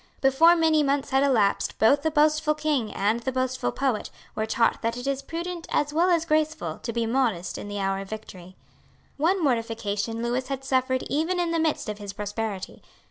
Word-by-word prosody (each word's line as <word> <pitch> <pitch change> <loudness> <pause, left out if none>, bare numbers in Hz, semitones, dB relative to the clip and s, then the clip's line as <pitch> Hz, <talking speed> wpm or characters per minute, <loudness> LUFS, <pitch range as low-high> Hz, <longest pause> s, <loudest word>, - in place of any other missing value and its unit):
Before 290 +6 +5
many 320 -2 +3
months 280 -1 0
had 265 0 +3
elapsed 235 -8 +2
both 280 +6 +4
the 315 - +1
boastful 305 0 +2
king 295 -7 -1
and 210 +4 0
the 260 +3 -3
boastful 255 - -1
poet 260 - -1 0.2
were 220 0 -2
taught 230 +1 +1
that 230 +1 -1
it 245 - -6
is 275 0 -1
prudent 335 +3 -5
as 295 0 0
well 340 +4 +3
as 335 -2 +2
graceful 310 - 0
to 230 - -4
be 230 0 -1
modest 225 -8 0
in - - -6
the 205 0 -5
hour 195 -1 -1
of 195 0 -8
victory. 185 -4 -9 0.6
One 345 +5 +1
mortification 225 -3 -1
Lewis 245 +2 -1
had 270 0 -4
suffered 260 -1 +1
even 325 +5 -1
in 345 -1 0
the 335 - +1
midst 315 -5 0
of 210 0 -5
his 200 -1 -7
prosperity. 205 -1 -5
260 Hz, 195 wpm, -25 LUFS, 220-305 Hz, 0.6 s, Before